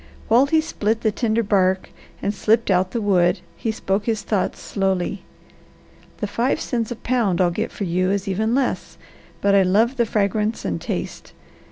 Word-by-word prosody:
While 245 +5 +5
he 315 +2 +3
split 225 -8 -1
the 220 - +2
tender 230 +1 0
bark 190 -2 +1 0.3
and 200 - 0
slipped 220 0 +2
out 185 0 +2
the 230 - -2
wood 180 -3 +2
he 225 - -2
spoke 205 -2 -2
his 225 -2 -1
thoughts 205 -4 -1
slowly: 195 -1 -1 1.0
"The - - -2
five 230 +5 0
cents 230 -3 -2
a 240 - -4
pound 230 -6 0
I'll 180 -2 +3
get 215 +6 -3
for - - -5
you 185 +1 0
is 200 +1 -1
even 220 +5 0
less, 270 -2 -1 0.4
but 200 0 +3
I 200 - +6
love 215 +8 +2
the 235 -2 +2
fragrance 210 +1 0
and 85 -3 -2
taste. - - -5
210 Hz, 180 wpm, -22 LUFS, 190-230 Hz, 1.0 s, I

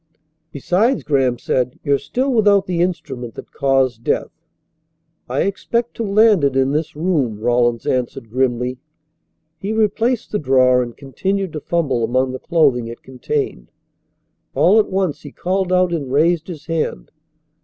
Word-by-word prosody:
"Besides," 195 - +1
Graham 135 -5 +1
said, 125 +1 -1
"you're 140 -2 +2
still 260 +2 -1
without 205 -3 +4
the 175 -2 -1
instrument 135 -10 -3
that - - -10
caused 135 -4 +1
death." - - -1 1.0
"I 130 +3 0
expect 235 +4 -2
to 230 - -2
land 210 -3 +4
it 140 -2 +2
in 135 0 +2
this 155 +2 -2
room," 150 - 0
Rawlins 120 0 +1
answered 125 -2 -2
grimly. 125 0 -1 0.8
He 195 +4 -3
replaced 225 +2 0
the 210 - 0
drawer 130 -2 +4
and 120 -1 -6
continued 190 +7 -3
to 155 - -4
fumble 145 -7 -1
among 130 +2 +1
the 130 - -6
clothing 130 -9 +2
it 115 0 -9
contained. 395 - -4 0.9
All 210 +5 +5
at 215 - +1
once 190 -5 -1
he 145 - -10
called 185 +3 -1
out 180 -1 +3
and 140 -6 -3
raised 160 +3 +2
his 165 -5 -8
hand. 165 -2 -3
150 Hz, 155 wpm, -19 LUFS, 130-190 Hz, 1.0 s, All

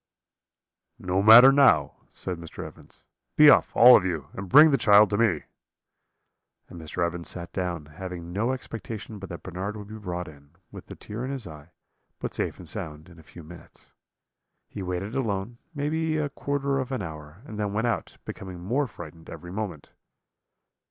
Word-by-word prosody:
"'No 90 +1 -1
matter 115 +6 +9
now,' 140 -1 +4 0.2
said 90 -2 -5
Mr. 85 -1 -8
Evans; - - -15 0.3
'be 150 -1 +8
off, - - +3
all 125 +2 +9
of - - +4
you, 80 -6 -3
and 95 -1 -7
bring 150 - +8
the 135 - +3
child 105 0 +6
to 100 - +1
me.' 100 -10 +2 1.2
"And 85 - -11
Mr. 85 +2 -2
Evans 85 0 -4
sat 85 -1 -7
down, 90 -5 -3
having 85 +2 -8
no 115 +6 0
expectation 110 -4 -7
but 95 - -9
that 85 - -8
Bernard 95 +4 -5
would 105 -1 -10
be 110 0 -9
brought 90 -3 -5
in, 70 +1 -16 0.2
with - - -11
the - - -9
tear 110 +3 -7
in 130 - -4
his 135 -5 -4
eye, 75 -1 -12 0.5
but - - -5
safe - - -2
and - - -11
sound, 75 +3 -5
in 85 -2 -16
a - - -13
few 80 +1 -14
minutes. 85 +3 -14 0.7
He - - -8
waited 90 +3 -4
alone, 115 -3 -3 0.2
maybe 155 +2 -1
a 150 -2 -1
quarter 140 0 -2
of 130 0 -4
an 130 -6 -3
hour, 75 +3 -10
and 105 -5 -8
then 105 -1 -1
went 110 +3 -1
out, 120 - -3
becoming 95 -2 -8
more 125 +11 -1
frightened 80 -5 -12
every 85 - -9
moment. 95 -7 -6
95 Hz, 185 wpm, -26 LUFS, 85-120 Hz, 1.2 s, matter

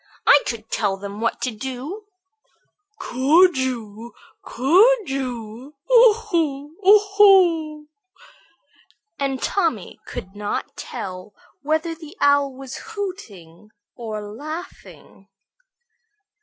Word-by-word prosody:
"I 285 - +7
could 225 -2 -6
tell 200 -3 0
them 200 +2 -8
what 230 - -1
to 255 - -1
do." 265 - -7 0.9
"Could 315 - +3
you, 235 -3 -4 0.3
could 390 - +3
you? 255 0 -6 0.2
Oo 475 -2 +8
hoo! 325 -9 -3
oo 410 +3 +7 0.2
hoo!" 335 -7 +4 1.3
and 270 -2 -1
Tommy 325 - -2
could 190 +2 -8
not 205 0 -4
tell 185 +2 -8 0.3
whether 315 +3 -1
the 320 +3 -13
Owl 285 -1 +2
was 270 0 -8
hooting 230 - -8 0.3
or 215 -3 -6
laughing. 285 - -10
275 Hz, 100 wpm, -21 LUFS, 225-340 Hz, 1.3 s, Oo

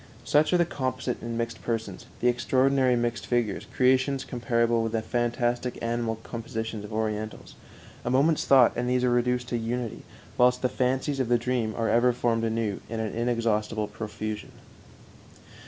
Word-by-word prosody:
Such 150 +3 +3
are 180 - +4
the 175 - +3
composite 130 -5 -3
and 115 0 -4
mixed 115 -1 -3
persons, 110 -5 -4
the 125 - +3
extraordinary 130 +1 +3
mixed 120 0 -2
figures, 120 -5 -1
creations 130 +1 +2
comparable 115 -1 +1
with 115 0 -2
the 110 -1 0
fantastic 120 +1 -1
animal 115 -1 -1
compositions 110 -2 -5
of 105 - -9
Orientals; 110 0 -3 0.5
a - - -2
moment's 145 +5 +3
thought 130 -3 +6
and 125 +1 -1
these 125 0 +1
are 125 - +3
reduced 125 0 +1
to 120 - 0
unity, 115 0 -3 0.4
whilst 125 +1 +4
the 125 - +3
fancies 130 +3 0
of 130 -3 0
the 120 - +5
dream 120 -2 -1
are 115 -1 0
ever 120 +2 +4
formed 115 -2 0
anew 110 -3 -1
in 115 0 -3
an 110 -1 -2
inexhaustible 115 -2 0
profusion. 105 0 -6
120 Hz, 165 wpm, -27 LUFS, 115-125 Hz, 0.5 s, thought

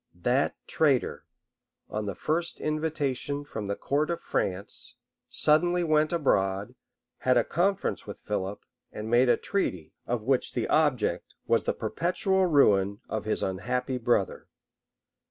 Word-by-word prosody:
That 130 +3 +2
traitor, 140 -5 +1 0.6
on 105 -1 -4
the 100 - -3
first 170 +2 -1
invitation 145 -2 -2
from 110 -7 -5
the 100 - -1
court 145 +8 0
of 170 - -1
France, 95 +2 -3 0.3
suddenly 175 +4 +3
went 155 -1 +2
abroad, 100 - +1 0.5
had 130 -1 +3
a 120 - +4
conference 185 - 0
with - - -7
Philip, 100 -1 -4 0.3
and 110 +1 -6
made 120 +1 +5
a - - +5
treaty, 90 - -2
of 120 -3 -1
which 130 +2 +1
the - - -1
object 145 -8 +1
was - - +2
the - - +1
perpetual 190 +2 +1
ruin 100 - +4
of 110 -1 -3
his 110 - -1
unhappy 125 +7 -2
brother. 115 -5 0
130 Hz, 135 wpm, -28 LUFS, 105-155 Hz, 0.6 s, made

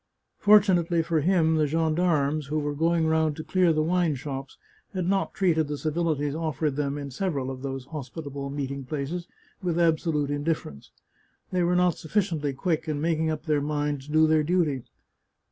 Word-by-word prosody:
Fortunately 185 -5 +4
for 165 -1 +1
him, 160 -1 +3
the 155 -1 +2
gendarmes, 155 -2 +1
who 150 +2 -1
were 145 -1 -1
going 165 +2 +1
round 160 -1 +2
to 155 - -6
clear 185 -1 +3
the 155 -1 +1
wine 170 -2 +1
shops, 135 0 -6 0.4
had 185 -2 -1
not 195 +2 0
treated 160 -5 +2
the 145 0 -3
civilities 155 -2 -1
offered 155 -2 -1
them 145 0 -1
in 140 -1 -6
several 140 -4 -2
of 130 -1 -7
these 135 -1 -5
hospitable 140 -1 -6
meeting 140 -1 -4
places 150 +6 -4 0.3
with 175 -2 -1
absolute 160 -3 +1
indiffer 145 - -1
ence. 70 0 -15 0.6
They 180 -1 +1
were 175 +1 +2
not 180 -1 +2
sufficiently 160 -5 -1
quick 160 +3 -1
in 150 -2 -1
making 160 0 +1
up 155 0 -3
their 150 -3 +1
minds 145 -1 -2
to - - -8
do 155 0 +6
their 155 0 +4
duty. 155 -4 +1
155 Hz, 180 wpm, -26 LUFS, 145-170 Hz, 0.6 s, do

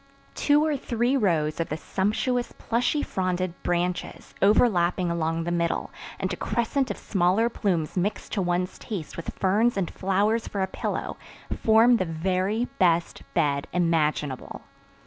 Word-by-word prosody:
Two 295 +1 +3
or 310 -2 +1
three 240 0 0
rows 165 - +1
of 165 - -1
the 155 - -2
sumptuous 230 +8 -1
plushy 245 +6 0
fronded 185 -1 -1
branches, 175 +1 -2
overlapping 185 -4 +3
along 165 0 -1
the 175 - -2
middle, 170 -1 -1 0.3
and 185 0 -1
a - - -1
crescent 235 +7 -1
of - - -3
smaller 195 +4 +2
plumes 180 -9 -1
mixed 195 +3 -2
to 200 - 0
one's 180 +1 -1
taste 190 -8 -6
with 165 - -5
ferns 210 +4 +2
and 190 -3 -1
flowers 205 +4 +1
for 200 -2 -2
a - - +2
pillow, - - -4 0.4
form 230 +2 +5
the 185 - 0
very 185 +7 0
best 170 -2 +2
bed 145 -4 +1
imaginable. 155 -5 0
185 Hz, 145 wpm, -26 LUFS, 170-220 Hz, 0.4 s, form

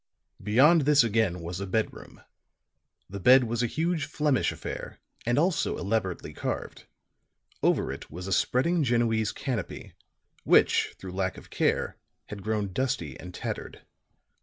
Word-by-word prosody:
Beyond 135 - +5
this 145 -1 +5
again 110 -6 +1
was 85 +2 -5
a 100 - -4
bedroom. 110 +3 -3 0.8
The 100 +1 -7
bed 130 +6 +7
was 120 0 -1
a 120 - +1
huge 160 +3 -1
Flemish 150 -2 +1
affair, - - -7 0.3
and 120 - +2
also 170 +2 +1
elaborately 100 -3 -2
carved; - - -5 0.7
over - - +2
it - - -8
was 90 +4 -7
a 95 - -1
spreading 160 - +2
Genoese 115 -4 +1
canopy, 120 -9 -5 0.5
which - - +3
through 95 - -8
lack 95 0 -2
of - - -13
care - - 0 0.3
had 105 -1 -7
grown 105 -2 -2
dusty 125 - -2
and 90 +3 -9
tattered. - - -6
115 Hz, 140 wpm, -27 LUFS, 95-135 Hz, 0.8 s, bed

